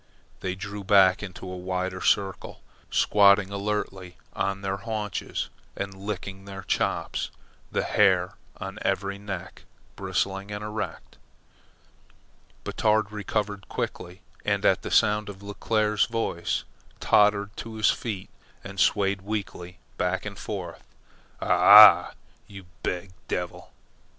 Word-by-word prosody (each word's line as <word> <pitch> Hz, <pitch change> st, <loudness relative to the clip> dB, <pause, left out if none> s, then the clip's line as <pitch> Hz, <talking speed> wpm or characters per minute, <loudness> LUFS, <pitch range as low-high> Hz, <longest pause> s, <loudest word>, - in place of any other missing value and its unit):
They 90 Hz, 0 st, -3 dB
drew 100 Hz, +1 st, -6 dB
back 95 Hz, -1 st, +5 dB
into 95 Hz, -3 st, -8 dB
a 90 Hz, -, -6 dB
wider 95 Hz, 0 st, -3 dB
circle, 95 Hz, -1 st, 0 dB, 0.3 s
squatting 100 Hz, -1 st, +4 dB
alertly 100 Hz, -3 st, -3 dB, 0.2 s
on 100 Hz, 0 st, -2 dB
their 95 Hz, 0 st, -1 dB
haunches 105 Hz, -1 st, -4 dB, 0.3 s
and 100 Hz, 0 st, -4 dB
licking 95 Hz, 0 st, -6 dB
their 95 Hz, -1 st, -8 dB
chops, -, -, -1 dB, 0.4 s
the -, -, 0 dB
hair 95 Hz, -3 st, +3 dB, 0.2 s
on 95 Hz, 0 st, -7 dB
every 100 Hz, +1 st, -1 dB
neck 95 Hz, -3 st, -7 dB, 0.3 s
bristling 95 Hz, +1 st, -2 dB
and 105 Hz, 0 st, -5 dB
erect. 105 Hz, -5 st, -6 dB, 1.4 s
Batard 110 Hz, -1 st, +1 dB
recovered 105 Hz, -1 st, -3 dB
quickly, 90 Hz, +1 st, -5 dB, 0.2 s
and -, -, 0 dB
at -, -, +2 dB
sound 105 Hz, 0 st, +3 dB
of 100 Hz, 0 st, -10 dB
Leclere's 105 Hz, +1 st, +1 dB
voice, 115 Hz, -7 st, -2 dB, 0.4 s
tottered 105 Hz, 0 st, +3 dB
to 115 Hz, -1 st, -7 dB
his 110 Hz, -1 st, +4 dB
feet 105 Hz, -6 st, -5 dB, 0.3 s
and 100 Hz, -1 st, -8 dB
swayed 100 Hz, -1 st, +2 dB
weakly 95 Hz, -3 st, -5 dB, 0.2 s
back 90 Hz, +2 st, -1 dB
and 100 Hz, -2 st, -7 dB
forth. 100 Hz, -4 st, -6 dB, 0.6 s
"A -, -, -3 dB
h -, -, 0 dB
ah! -, -, +9 dB, 0.3 s
You 95 Hz, -2 st, -11 dB, 0.2 s
beeg 90 Hz, +1 st, -3 dB, 0.2 s
devil!" -, -, -4 dB
100 Hz, 120 wpm, -26 LUFS, 95-105 Hz, 1.4 s, ah